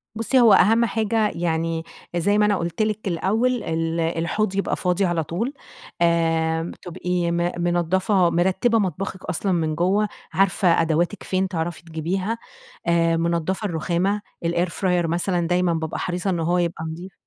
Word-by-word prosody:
بُصي، 230 +4 +2
هو 230 -4 +7
أهم 225 +4 +5
حاجة 220 -1 +1
يعني 165 -1 -1 0.3
زي 200 +5 +2
ما 210 - +4
أنا 210 -1 +3
قُلت 170 +3 -3
لِك 215 -1 -1
الأول، 220 +8 0
ال 165 +1 -1
الحوض 170 +5 -1
يبقى 200 - 0
فاضي 180 +1 0
على 170 -2 0
طول، 230 - -3 0.5
آآ 165 -1 +1
تبقي 180 -1 -2
م 175 +1 0
منضّفة 175 +2 +2
مرتّبة 190 +7 +2
مطبخِك 190 0 -3
أصلًا 195 +4 -1
من 160 -3 0
جُوَّه، 195 +6 +2 0.3
عارفة 185 -3 +3
أدواتِك 165 +5 0
فين 190 0 0
تعرفي 170 -2 -4
تجيبيها، 180 +7 -2 0.5
آآ 165 -1 +3
منضّفة 170 +4 -1
الرُّخامة، 180 +3 0 0.2
الإير 170 +1 +1
فراير 180 -1 0
مثلًا 175 +1 0
دايمًا 180 -1 +2
بابقى 160 -1 -3
حريصة 180 +2 -2
إن 175 - 0
هو 170 +2 +1
يبقى 170 -2 -1
نضيف. 175 +4 -7
175 Hz, 155 wpm, -23 LUFS, 165-195 Hz, 0.5 s, هو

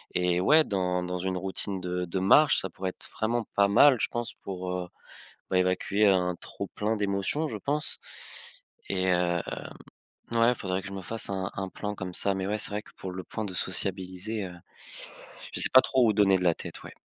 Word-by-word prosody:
et 90 -1 +2
ouais 155 - +6
dans 90 -6 -1
dans 90 0 -3
une 95 +1 -2
routine 95 +1 -2
de 90 0 -2
de 90 +2 -2
marche 145 +11 +6
ça 95 - -4
pourrait 95 0 -4
être - - -14
vraiment 115 +2 0
pas 100 0 +5
mal 130 +7 +6
je - - +1
pense 120 -1 -4
pour, 90 -1 -4
heu, 90 -1 -3 0.6
bah 95 - 0
évacuer 95 +3 +2
un 90 -2 +3
trop - - -6
plein 105 +2 -1
d'émotions, 100 +9 0
je - - -4
pense. 150 +1 -1 0.9
Et 95 -1 0
hem, 90 -2 +2 0.9
ouais 115 +1 +4
faudrait 95 -4 -2
que - - -9
je - - -8
me 95 -1 -5
fasse 115 +5 -2
un 95 -1 -2
un 95 -1 -3
plan 105 +2 -5
comme 90 -1 -5
ça. 100 +2 +1
Mais 95 0 -2
ouais 105 +2 -1
c'est - - -1
vrai 105 +1 -3
que - - -18
pour 95 - -6
le 90 0 -6
point 110 - -4
de 95 -3 -5
sociabiliser, 95 +3 -2
heu, 90 -1 -7 1.0
je - - -1
sais - - +2
pas 130 - +10
trop 130 -2 +3
où 110 - +4
donner 100 -2 +4
de 90 - -2
la 85 -2 +4
tête, - - -8
ouais. - - -9
95 Hz, 215 wpm, -28 LUFS, 90-105 Hz, 1.0 s, pas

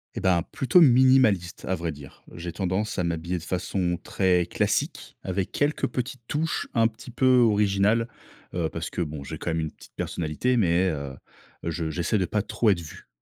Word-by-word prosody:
Et - - -2
ben, 90 -3 +2
plutôt 155 +4 +4
minimaliste 130 - +4
à 95 - 0
vrai 85 -2 -3
dire. 70 -2 -13
J'ai 85 0 -6
tendance 95 +4 -2
à - - +1
m'habiller 85 +1 -2
de 85 - -7
façon 90 0 -1
très 90 -2 +2
classique 85 - -1
avec 95 0 -2
quelques 145 +1 +1
petites 130 0 -4
touches 160 +2 -1
un 115 -1 +4
petit 120 +3 -12
peu 130 +2 +4
originales, 105 0 +3 0.4
heu, 85 -2 0
parce 80 +1 -5
que - - -3
bon, 75 -3 -4
j'ai - - -6
quand - - -3
même 80 0 0
une 80 -1 -3
petite - - -17
personnalité, 85 +11 -1
mais, 90 -3 +3
heu, 70 -4 -4 0.5
je 85 -1 -2
j'essaie 85 +6 0
de 95 - +1
pas 105 +4 0
trop 110 +2 +1
être 90 -3 0
vu. 80 - -11
95 Hz, 190 wpm, -26 LUFS, 85-115 Hz, 0.5 s, plutôt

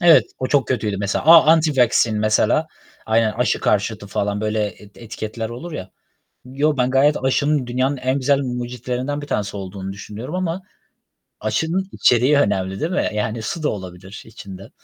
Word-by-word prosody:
Evet, 170 -2 +6
o 130 - -1
çok 135 -3 +1
kötüydü 105 -5 -1
mesela. 100 +6 -2
A 160 -1 +8
anti-vaccine 130 -8 +2
mesela, 110 +8 +2 0.4
aynen, 110 0 +2
aşı 120 0 0
karşıtı 105 0 0
falan 100 +1 -2
böyle 110 0 0
eti 100 +1 -12
etiketler 110 0 -5
olur 145 +9 -8
ya. 95 -8 -7 0.5
Yo, 140 +4 0
ben 125 -1 +1
gayet 140 +3 +3
aşının 145 +1 +1
dünyanın 130 +3 0
en 130 +1 -1
güzel 140 +1 +2
mucitlerinden 125 +2 -3
bir - - -7
tanesi 105 -7 -2
olduğunu 95 0 -6
düşünüyorum 105 - -8
ama 185 0 -2 0.8
aşının 160 - -1
içeriği 125 +5 +3
önemli 95 -8 0
değil 160 - -1
mi? 185 - 0
Yani, 110 +1 -2
suda 155 +7 -2
olabilir 95 0 -7
içinde. 100 -3 -11
120 Hz, 160 wpm, -20 LUFS, 105-145 Hz, 0.8 s, A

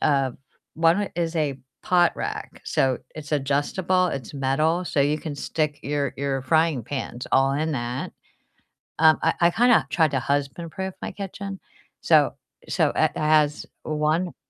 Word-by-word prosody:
a 135 -4 +2 0.4
1 165 +5 +2
is 170 -1 -2
a 145 -4 0 0.2
pot 175 -2 +3
rack, - - -5
so 130 -2 +1 0.2
it's 155 -1 -9
adjustable, 150 +6 +1
it's 135 -7 -5
metal, 155 +6 0
so 145 - 0
you 150 +2 +1
can 155 -3 -5
stick 150 0 -2
your 145 -2 -2
your 135 -1 -1
frying 155 -1 +2
pans 130 -1 -5
all 135 +1 +3
in 155 +2 -1
that, 120 -1 -3 0.9
um, 155 -1 +6
I 165 - +3
I 170 0 +5
kinda 230 - +4
tried 155 0 +2
to 135 - +1
husband-proof 160 +7 -3
my - - -5
kitchen, 195 0 -6 0.4
so - - +4 0.3
so - - +2
it - - +2
has 150 -1 +2 0.2
1 155 +3 0
150 Hz, 150 wpm, -24 LUFS, 140-170 Hz, 0.9 s, um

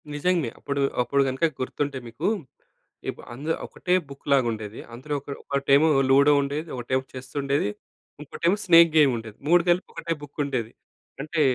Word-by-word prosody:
నిజంగా. 165 -3 +1
అప్పుడు 140 0 -2 0.2
అప్పుడు 140 +3 +1
కనుక 130 +5 0
గుర్తుంటే 140 +2 -2
మీకు 115 +8 -3 0.8
ఇప్ - - -6
అంద్ 145 +7 -3
ఒకటే 180 - -2 0.2
బుక్ 140 0 -12
లాగా 135 -3 +4
ఉండేది. 110 -1 -6
అందులో 135 +5 -6
ఒక్ 145 - -15
ఒకటేమో 140 +2 +3 0.2
లూడో 140 +2 +6
ఉండేది, 145 +4 -3
ఒకటేమో 130 +2 -1
చెస్సుండేది, 135 -1 -2 0.5
ఇంకోటేమో 170 +6 0
స్నేక్ 170 -2 +7
గేముండేది. 115 -7 +2
3 175 +1 +6
కలిపి 175 +1 +2
ఒకటే 165 0 -3
బుక్కుండేది. 140 -5 -3 0.5
అంటే 155 +1 -1
140 Hz, 140 wpm, -25 LUFS, 130-155 Hz, 0.8 s, స్నేక్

